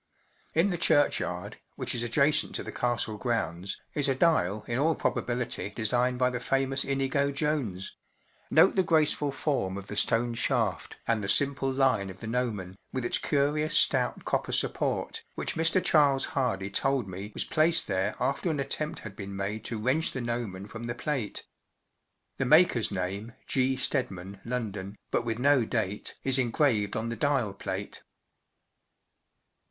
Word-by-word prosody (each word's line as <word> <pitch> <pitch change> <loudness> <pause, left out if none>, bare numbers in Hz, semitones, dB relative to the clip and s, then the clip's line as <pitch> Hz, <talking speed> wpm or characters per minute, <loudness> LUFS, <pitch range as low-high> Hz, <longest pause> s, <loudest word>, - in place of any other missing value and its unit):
In 165 +5 +4
the 175 - -3
churchyard, 145 -3 +1 0.2
which - - +1
is 120 - 0
adjacent 140 +5 +2
to - - -2
the - - -7
Castle 120 -3 -1
grounds, 95 -6 -2
is 145 -2 +2
a 135 - +2
dial 110 - +2
in 120 +1 -1
all 160 +2 +2
probability 120 -4 -1
designed 120 +3 0
by 125 0 +2
the 125 - -3
famous 135 +1 0
Inigo 140 +1 0
Jones—note 140 -10 -1
the 190 - +4
graceful 155 -4 +2
form 135 -9 -1
of 100 - -7
the 105 - -7
stone 120 +3 +2
shaft 115 -5 -1
and 115 -3 +1
the 100 - -2
simple 135 +4 +3
line 130 -7 +1
of 95 - -10
the - - -8
gnomon, 110 -6 -3
with 130 -2 -3
its - - +1
curious 150 +2 +2
stout - - +2
copper - - -1
support, - - -1
which - - -1
Mr. 165 +3 +3
Charles 145 -6 +4
Hardy 100 -8 -1
told 135 -1 +1
me 95 +2 -7
was - - 0
placed 160 +2 +3
there 95 -1 -1
after 135 +7 0
an 155 -3 -1
attempt 150 +2 -2
had 105 -3 -9
been 100 0 -7
made 100 +3 -3
to 115 - -2
wrench 130 +8 +1
the 130 - -3
gnomon 115 -5 -4
from 110 +2 -8
the 120 0 -4
plate. 130 -5 -3 0.9
The 135 - 0
maker's 155 -6 +5
name, 100 +4 -4
“G* 130 0 +2
Stedman, 100 -8 -2
London,” 105 -5 -4
but - - +1
with 115 -1 -2
no 135 0 +4
date, 105 -3 -2
is 135 0 +5
engraved 120 -4 +1
on 115 +1 -2
the 115 - -3
dial 130 -5 0
plate. 100 - -5
125 Hz, 160 wpm, -28 LUFS, 105-140 Hz, 0.9 s, maker's